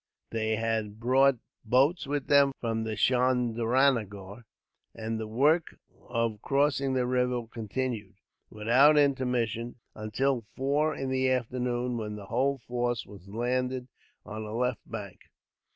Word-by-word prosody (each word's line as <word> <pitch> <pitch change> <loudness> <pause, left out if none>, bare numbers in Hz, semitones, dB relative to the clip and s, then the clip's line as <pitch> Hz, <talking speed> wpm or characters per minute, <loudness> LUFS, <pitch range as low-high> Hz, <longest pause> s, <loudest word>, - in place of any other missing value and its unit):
They 110 -1 0
had 110 -1 -2
brought 130 +2 +4 0.3
boats 135 +8 +2
with 145 -1 -2
them 140 -1 +5
from 115 -1 -2
Chandranagore, 120 -3 +1 0.5
and 110 0 -3
the 110 - -4
work 150 +9 +2 0.3
of 115 -3 -1
crossing 140 -1 +1
the 125 -1 +1
river 125 -1 0
continued, 115 -2 -4 0.3
without 125 +8 +4
intermission, 125 -5 +1 0.2
until 115 +2 -1
four 145 +4 +1
in 135 -1 -3
the 130 0 +2
afternoon, 125 -1 -1
when 105 -2 -4
the 105 -1 -8
whole 130 +6 +1
force 120 -2 -2
was 100 -2 -13
landed 125 +3 -1 0.4
on 110 +1 -6
the 105 0 -6
left 125 -1 -1
bank. - - -7
125 Hz, 125 wpm, -29 LUFS, 110-130 Hz, 0.5 s, them